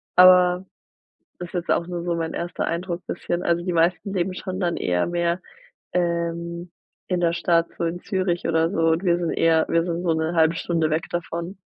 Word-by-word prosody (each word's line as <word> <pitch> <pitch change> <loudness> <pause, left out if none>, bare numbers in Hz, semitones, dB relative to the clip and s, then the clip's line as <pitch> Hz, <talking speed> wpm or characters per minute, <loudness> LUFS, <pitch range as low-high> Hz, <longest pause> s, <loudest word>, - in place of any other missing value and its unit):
Aber 180 0 +6 0.7
das 175 -1 -7
jetzt 175 -2 -3
auch 170 - +1
nur 175 -1 -4
so 175 -1 -1
mein 165 -1 -3
erster 175 +1 -3
Eindruck 170 +1 -3
bisschen. 175 +1 -3
Also, 170 0 +1
die 180 - -1
meisten 175 +4 +1
leben 185 -1 -1
schon 185 0 -5
dann 175 -2 0
eher 90 0 0
mehr, 175 +1 0 0.5
ähm, 170 0 -2 0.4
in 180 -1 +1
der 170 -1 +2
Stadt, 170 0 +2
so - - -2
in 170 +1 -2
Zürich 185 -4 -1
oder 165 0 +2
so 165 -4 +1
und 165 +3 0
wir 175 -2 +3
sind 170 -2 -1
eher 165 -1 +3
wir 165 0 +3
sind 170 0 -3
so 170 -2 +2
'ne 160 +1 -1
1/2 160 0 +4
Stunde 165 -2 0
weg 155 +1 0
davon. 170 +3 -4
170 Hz, 200 wpm, -23 LUFS, 165-180 Hz, 0.7 s, Aber